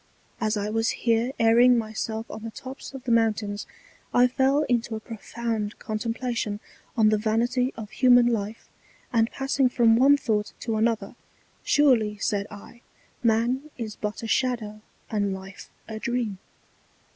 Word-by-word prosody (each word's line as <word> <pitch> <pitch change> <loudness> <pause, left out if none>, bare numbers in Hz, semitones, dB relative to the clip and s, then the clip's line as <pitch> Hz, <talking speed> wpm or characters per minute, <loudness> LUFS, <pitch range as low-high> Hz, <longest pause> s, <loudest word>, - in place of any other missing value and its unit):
As 215 -1 0
I 205 0 -2
was 225 +1 +1 0.2
here 230 +2 +2
airing 240 +2 +6
my 220 -1 -3
self 220 0 -3
on 215 - -7
the 225 - -5
Tops 265 +4 -9
of 265 - -8
the 250 - -2
Mountains, 215 -3 +1 0.5
I 245 - +7
fell 265 +3 +2
into 235 -3 0
a - - -4
profound 225 -1 -4
Contemplation 225 -1 -3 0.4
on 215 -2 +5
the 215 -1 +2
Vanity 240 +4 +1
of 215 -2 -7
human 245 -1 +5
Life; 225 -2 -2 0.5
and 225 -1 +3
passing 270 -1 +1
from 230 -2 +4
one 275 +4 +6
Thought 215 -6 -1
to 225 -2 -2
another, 225 0 0 0.5
Surely, 235 -8 +3
said 205 0 -1
I, 210 +3 -12 0.4
Man 240 +5 +1
is 220 -3 -5
but 210 +1 -5
a - - -3
Shadow 220 -4 -1 0.3
and 205 -3 0
Life 190 0 -11 0.2
a 220 -1 -6
Dream. 235 -5 -2
225 Hz, 155 wpm, -25 LUFS, 215-245 Hz, 0.5 s, I